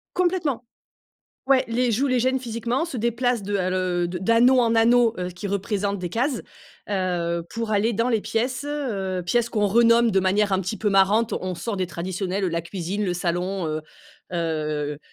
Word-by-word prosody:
Complètement. 345 -9 0 0.8
Ouais, 270 -1 +4
les 240 +1 +1
jouent, 265 +6 +1
les 255 -2 +2
gênent 260 +2 +2
physiquement, 240 +4 -2
se 305 -7 -6
déplacent 235 0 0
de 200 +1 -1
à 185 -1 0
le 185 -1 0
d'anneau 230 +8 +4
en 230 -1 +2
anneau, 235 0 +4
heu, 180 0 -2
qui 180 +3 -7
représentent 200 0 -1
des 180 - -4
cases, 245 - -1 0.5
heu, 175 -3 -1
pour 230 +3 -4
aller 215 +3 +2
dans 230 +3 0
les 225 -4 +2
pièces. 240 +5 -1
Heu, 200 -11 -2
pièces 235 +4 +1
qu'on 210 -3 +1
renomme 230 +2 +4
de 190 -1 +3
manière 200 +2 +2
un 190 - +2
petit 190 +4 -4
peu 210 - 0
marrante. 200 +4 +3
On 185 0 -4
sort 205 +5 -4
des 185 -1 -1
traditionnels, 185 +3 -3
heu, 185 - +1
la 170 0 -2
cuisine, 190 +4 -3
le 180 - 0
salon, 180 +1 -2
heu 155 0 -3 0.5
heu 155 -3 -2
205 Hz, 185 wpm, -24 LUFS, 185-235 Hz, 0.8 s, Ouais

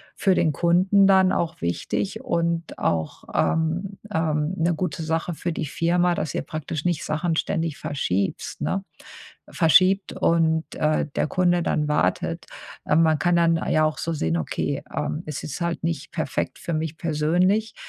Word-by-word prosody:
für 190 -2 +2
den 160 -3 +2
Kunden 185 +5 +4
dann 190 -1 +5
auch 165 -1 -1
wichtig 195 - -2
und 170 -7 -1
auch, 80 -2 -2
ähm 170 +5 0 0.2
ähm, 155 0 0
'ne 170 +1 +2
gute 160 -1 -3
Sache 165 +2 -1
für 175 +2 -3
die 160 - -3
Firma, 175 +4 +1
dass 155 - -3
ihr - - -1
praktisch 155 0 -5
nicht 175 -4 0
Sachen 160 +2 -1
ständig 160 -2 -1
verschiebst 100 -9 -2
ne, 195 +1 -1 0.7
verschiebt 185 +4 +4
und, 160 -1 +1
äh, 155 0 +1
der - - +2
Kunde 175 0 +2
dann 150 -2 0
wartet. 150 - 0 0.4
Ähm, 155 +2 +4
man 160 -2 +3
kann 175 -1 +2
dann 165 -1 +4
ja 155 0 +3
auch 155 0 0
so 165 - -2
sehen, 85 - 0
okay, 80 - -2
ähm: 75 0 -2
„Ist 150 -2 -5
jetzt 145 +3 -6
halt 170 0 -2
nicht 160 -3 -3
perfekt 160 - -2
für 170 - -4
mich 160 0 -3
persönlich, 175 +7 +1
165 Hz, 165 wpm, -24 LUFS, 155-175 Hz, 0.7 s, dann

